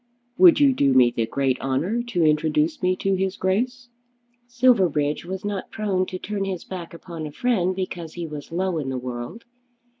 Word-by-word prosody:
"Would 350 -5 +8
you 280 -2 +5
do 140 - +2
me 125 -2 +6
the 115 -1 -1
great 135 0 0
honour 155 - 0
to 235 -8 -1
introduce 155 0 +1
me 185 0 +2
to 195 +1 0
his 190 0 -1
Grace?" 245 +7 -1 0.6
Silverbridge 190 - +2
was 190 +2 -5
not 205 -2 -3
prone 195 -4 -1
to 185 - -5
turn 200 +1 -3
his 190 -3 -4
back 175 -3 -8
upon 165 -2 -7
a - - -8
friend 185 -1 0
because 175 -4 -5
he 175 -1 -4
was 150 -1 -8
low 180 -1 -1
in 135 -3 -3
the 130 - -2
world. 125 - -6
180 Hz, 185 wpm, -23 LUFS, 150-200 Hz, 0.6 s, Would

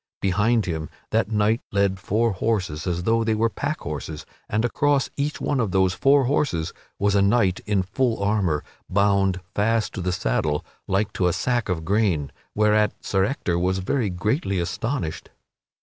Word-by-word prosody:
Behind 105 +4 +2
him, 80 -3 -3 0.2
that 95 - +1
knight 105 +2 +2
led 100 -1 +1
four 110 +5 +1
horses 95 -5 -1
as 90 -1 -1
though 115 +3 +2
they 110 -1 +1
were 115 +1 +1
pack 150 +2 -3
horses, 75 +1 -5 0.2
and 110 +3 +1
across 145 +3 +1
each 145 +2 -2
one 140 - 0
of 115 -4 +1
those 95 -1 +2
four 140 +6 +4
horses 125 - 0 0.2
was 100 0 +2
a 100 - +4
knight 100 -2 +3
in 100 -3 +2
full 115 +4 0
armor, 100 -8 +1 0.3
bound 100 -1 +2
fast 115 +2 +1
to 95 - -4
the 90 0 0
saddle 75 -1 0 0.2
like 100 +2 0
to 90 - +1
a 90 - +1
sack 120 +5 0
of 80 -3 -2
grain, 95 -7 +1 0.2
whereat 105 0 +3
Sir 95 -1 +2
Ector 90 -8 -1
was 90 +2 +1
very 105 +4 0
greatly 100 - -1
astonished. 90 - -3
100 Hz, 170 wpm, -24 LUFS, 90-115 Hz, 0.3 s, four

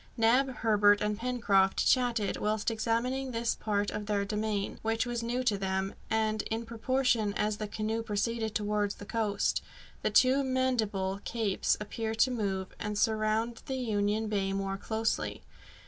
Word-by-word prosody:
Neb, 240 +4 +4
Herbert, 205 -2 +5
and 210 0 0
Pencroft 215 -5 +2
chatted, 240 -5 +2
whilst 215 +1 0
examining 240 +4 -1
this 230 -1 0
part 205 -1 -1
of 210 -1 -5
their 200 -1 0
domain, 210 -1 -2
which 225 +1 0
was 240 -1 -2
new 240 +2 -1
to 210 -5 +1
them, 190 0 -1 0.2
and, 220 -1 +1
in 225 +1 -2
proportion 230 -2 +1
as 210 0 0
the 215 - -4
canoe 220 +2 -2
proceeded 220 +1 -2
towards 210 -1 0
the 205 - -10
south, 215 -3 +1 0.4
the - - +1
two 265 +2 +4
Mandible 225 -7 0
Capes 220 -5 0
appeared 220 +1 -4
to 255 +3 +4
move, 195 -5 -2
and 210 0 -3
surround 220 +1 +1
Union 220 -4 0
Bay 195 -2 0
more 195 0 -2
closely. 225 +2 -2
220 Hz, 150 wpm, -30 LUFS, 205-230 Hz, 0.4 s, Herbert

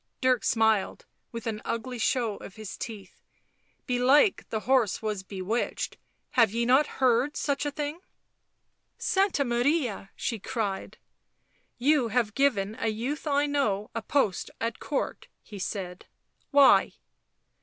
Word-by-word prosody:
Dirk 255 -2 +2
smiled, 220 -3 +1 0.3
with 230 -1 -7
an 215 -2 -3
ugly 230 +2 -4
show 225 -2 0
of 190 - -11
his 215 -2 -7
teeth. 210 -7 -8 0.3
" - - -42
Belike 260 - +3
the 220 - -2
horse 250 -6 +2
was 210 -3 -2
bewitched 195 +4 -3 0.2
— - - -46
have 230 -4 +4
ye 235 +3 -1
not 265 +5 +4
heard 260 +2 +2
such 285 0 -1
a - - -2
thing 295 +2 -4 0.4
?" - - -50
" - - -50 0.2
Santa 385 -7 +2
Maria 240 -4 0
!" - - -44
she 230 - -3
cried. 205 -3 -3 0.4
" - - -42
You 280 -6 +3
have 225 -2 0
given 220 -7 +1
a 230 - -1
youth 245 +9 -3
I 285 0 +2
know 220 -9 0
a 230 - -3
post 220 -6 0
at 230 0 -2
Court," 285 - -3 0.2
he 205 -2 -10
said. 185 -2 -5 0.2
" - - -43
Why 280 -1 +6
235 Hz, 155 wpm, -27 LUFS, 215-275 Hz, 0.4 s, Why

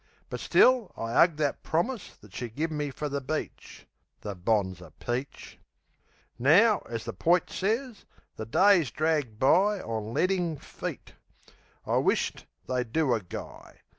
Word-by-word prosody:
But - - -4
still 250 -6 +4
I 115 0 -4
'ug 165 +3 +5
That 150 -2 -1
promise 205 +7 -2
that 105 -2 -17
she 120 - -5
give 155 +8 -3
me 150 -1 -2
fer 150 +2 -4
the 140 0 -3
beach. 155 +4 -6 0.4
The 100 -1 -5
bonzer 95 -2 -1
peach! 125 +3 -5 0.8
Now, 195 - +5
as 115 -1 -5
the - - -4
poit 170 - +2
sez, 225 +4 -2 0.3
the 110 - -6
days 180 - +4
drag 150 -5 -1
by 190 - +3
On 110 -6 -4
ledding 180 +1 0
feet. - - -7 0.7
I - - +1
wish't - - 0 0.2
they'd 125 -3 -2
do 150 -2 +2
a 115 - 0
guy. 90 - -10
145 Hz, 145 wpm, -28 LUFS, 115-180 Hz, 0.8 s, ug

